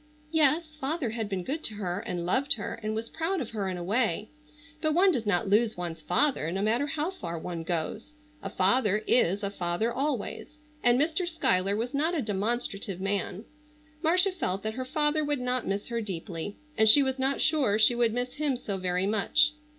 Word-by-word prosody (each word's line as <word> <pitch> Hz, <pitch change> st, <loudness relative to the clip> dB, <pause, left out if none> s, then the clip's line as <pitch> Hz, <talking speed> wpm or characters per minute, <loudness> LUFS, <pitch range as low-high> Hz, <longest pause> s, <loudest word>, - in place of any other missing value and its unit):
Yes, 310 Hz, 0 st, +2 dB
father 285 Hz, -3 st, -2 dB
had 225 Hz, -2 st, -3 dB
been 190 Hz, -3 st, -2 dB
good 295 Hz, -, -3 dB
to 215 Hz, -, -2 dB
her, 185 Hz, -3 st, -3 dB
and 175 Hz, -3 st, -4 dB
loved 260 Hz, +10 st, +2 dB
her 215 Hz, +1 st, -5 dB
and 215 Hz, 0 st, -2 dB
was 225 Hz, +1 st, -3 dB
proud 330 Hz, +7 st, -2 dB
of 255 Hz, -, -5 dB
her 205 Hz, -4 st, -2 dB
in 185 Hz, -, -4 dB
a 175 Hz, -, -5 dB
way. 210 Hz, 0 st, 0 dB, 0.5 s
But 310 Hz, -1 st, +1 dB
one 375 Hz, +2 st, +5 dB
does 240 Hz, -9 st, -2 dB
not 200 Hz, -1 st, +1 dB
lose 215 Hz, +2 st, +2 dB
one's 170 Hz, -2 st, -5 dB
father 175 Hz, -, +2 dB
no 195 Hz, +2 st, -2 dB
matter 235 Hz, +7 st, +1 dB
how 315 Hz, +3 st, -2 dB
far 170 Hz, -, -6 dB
one 170 Hz, 0 st, -5 dB
goes. 175 Hz, -, -3 dB, 0.3 s
A -, -, -5 dB
father 210 Hz, +2 st, +2 dB
is 200 Hz, -3 st, +2 dB
a 200 Hz, -, -1 dB
father 185 Hz, +5 st, -1 dB
always; 280 Hz, +2 st, -3 dB, 0.3 s
and 245 Hz, +1 st, +4 dB
Mr. 330 Hz, +4 st, 0 dB
Schuyler 200 Hz, -, +1 dB
was 235 Hz, +5 st, -3 dB
not 315 Hz, +5 st, +1 dB
a 310 Hz, -, 0 dB
demonstrative 205 Hz, -2 st, -2 dB
man. 195 Hz, +1 st, -2 dB, 0.6 s
Marcia 360 Hz, +4 st, +4 dB
felt 195 Hz, -, -3 dB
that 220 Hz, 0 st, -2 dB
her 255 Hz, +2 st, -4 dB
father 300 Hz, +3 st, +1 dB
would 290 Hz, -2 st, -1 dB
not 250 Hz, -1 st, -1 dB
miss 200 Hz, +3 st, -2 dB
her 235 Hz, -1 st, -2 dB
deeply, 185 Hz, -1 st, -5 dB, 0.2 s
and 220 Hz, 0 st, +5 dB
she 280 Hz, +6 st, +8 dB
was 265 Hz, 0 st, -1 dB
not 270 Hz, +1 st, +1 dB
sure 265 Hz, -10 st, +2 dB
she 220 Hz, +2 st, +5 dB
would 235 Hz, -1 st, +2 dB
miss 245 Hz, +2 st, -3 dB
him 290 Hz, -4 st, -1 dB
so 200 Hz, -5 st, -4 dB
very 180 Hz, 0 st, 0 dB
much. 220 Hz, +9 st, +3 dB
225 Hz, 205 wpm, -28 LUFS, 195-290 Hz, 0.6 s, she